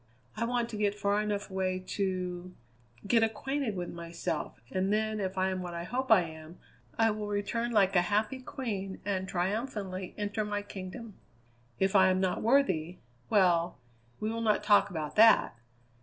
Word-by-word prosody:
I 225 Hz, +2 st, -1 dB
want 240 Hz, 0 st, 0 dB
to 215 Hz, -, -5 dB
get 205 Hz, -1 st, +1 dB
far 205 Hz, 0 st, +1 dB
enough 205 Hz, -1 st, -3 dB
away 185 Hz, -1 st, 0 dB
to 180 Hz, -2 st, -3 dB, 0.5 s
get 230 Hz, +3 st, +4 dB
acquainted 230 Hz, +1 st, -1 dB
with 175 Hz, -1 st, -4 dB
myself, 170 Hz, -7 st, -4 dB
and 190 Hz, +1 st, 0 dB
then 215 Hz, 0 st, 0 dB
if 190 Hz, -1 st, -3 dB
I 190 Hz, 0 st, +2 dB
am 185 Hz, 0 st, -3 dB
what 175 Hz, -1 st, -6 dB
I 170 Hz, -, -4 dB
hope 250 Hz, +6 st, -2 dB
I 215 Hz, -4 st, +8 dB
am, 160 Hz, +1 st, -10 dB, 0.4 s
I 225 Hz, -1 st, +4 dB
will 210 Hz, 0 st, -4 dB
return 210 Hz, +4 st, -1 dB
like 200 Hz, -3 st, +3 dB
a 175 Hz, -, +6 dB
happy 210 Hz, +8 st, 0 dB
queen 205 Hz, -7 st, -5 dB
and 190 Hz, -2 st, -1 dB
triumphantly 190 Hz, 0 st, -3 dB
enter 205 Hz, +1 st, -2 dB
my 205 Hz, -1 st, -3 dB
kingdom. 200 Hz, +2 st, -8 dB, 0.6 s
If 195 Hz, +1 st, +1 dB
I 190 Hz, -1 st, +7 dB
am 185 Hz, 0 st, +2 dB
not 185 Hz, -1 st, 0 dB
worthy 185 Hz, -, +2 dB, 0.3 s
well, 180 Hz, -4 st, +3 dB, 0.4 s
we 215 Hz, +1 st, -1 dB
will 230 Hz, 0 st, -3 dB
not 215 Hz, -2 st, +2 dB
talk 205 Hz, -1 st, +5 dB
about 155 Hz, -5 st, -5 dB
that! 220 Hz, -, +6 dB
200 Hz, 170 wpm, -30 LUFS, 185-220 Hz, 0.6 s, I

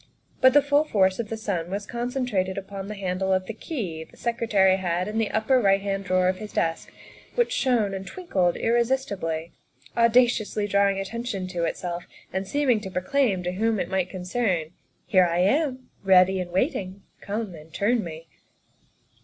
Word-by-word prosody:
But 260 Hz, 0 st, +7 dB
the 290 Hz, 0 st, +6 dB
full 285 Hz, +1 st, +3 dB
force 190 Hz, -9 st, +2 dB
of 225 Hz, -3 st, -3 dB
the 225 Hz, -, -3 dB
sun 185 Hz, -6 st, -3 dB
was 200 Hz, +2 st, -3 dB
concentrated 240 Hz, -6 st, -2 dB
upon 195 Hz, 0 st, -6 dB
the 210 Hz, -, -5 dB
handle 190 Hz, -1 st, -2 dB
of 185 Hz, 0 st, +1 dB
the 225 Hz, -, -5 dB
key 205 Hz, -, -5 dB
the -, -, -20 dB
Secretary 210 Hz, -5 st, +2 dB
had 180 Hz, -1 st, -1 dB
left -, -, -5 dB
in 220 Hz, +1 st, -2 dB
the 225 Hz, -, +1 dB
upper 250 Hz, +4 st, +2 dB
right 195 Hz, -2 st, +4 dB
hand 195 Hz, 0 st, -3 dB
drawer 185 Hz, 0 st, +2 dB
of 185 Hz, 0 st, +1 dB
his 215 Hz, -1 st, -7 dB
desk, 165 Hz, 0 st, -1 dB, 0.4 s
which 480 Hz, -1 st, +2 dB
shone 245 Hz, -, +1 dB
and 195 Hz, 0 st, -5 dB
twinkled 190 Hz, -, 0 dB
irresisti 240 Hz, -2 st, 0 dB
bly, 165 Hz, 0 st, -3 dB, 0.4 s
audaciously 235 Hz, -3 st, +3 dB
drawing 200 Hz, -1 st, +2 dB
attention 210 Hz, 0 st, -4 dB
to 175 Hz, -2 st, -1 dB
itself 175 Hz, 0 st, -4 dB, 0.3 s
and 190 Hz, 0 st, -2 dB
seem 285 Hz, +7 st, 0 dB
ing 225 Hz, -, +3 dB
to 200 Hz, -2 st, -7 dB
proclaim 195 Hz, 0 st, 0 dB
to 180 Hz, -, -1 dB
whom 220 Hz, +3 st, 0 dB
it -, -, -3 dB
might 185 Hz, -1 st, 0 dB
concern, 180 Hz, -3 st, -1 dB, 0.2 s
" -, -, -43 dB
Here 185 Hz, -2 st, +4 dB
I 170 Hz, 0 st, -1 dB
am, 255 Hz, -, +1 dB
ready 190 Hz, 0 st, +5 dB
and 180 Hz, -1 st, -4 dB
waiting, 185 Hz, +1 st, -1 dB, 0.2 s
come 210 Hz, -1 st, -4 dB
and 160 Hz, 0 st, -13 dB
turn 215 Hz, +6 st, +1 dB
me." 165 Hz, 0 st, -8 dB
195 Hz, 185 wpm, -25 LUFS, 185-235 Hz, 0.4 s, But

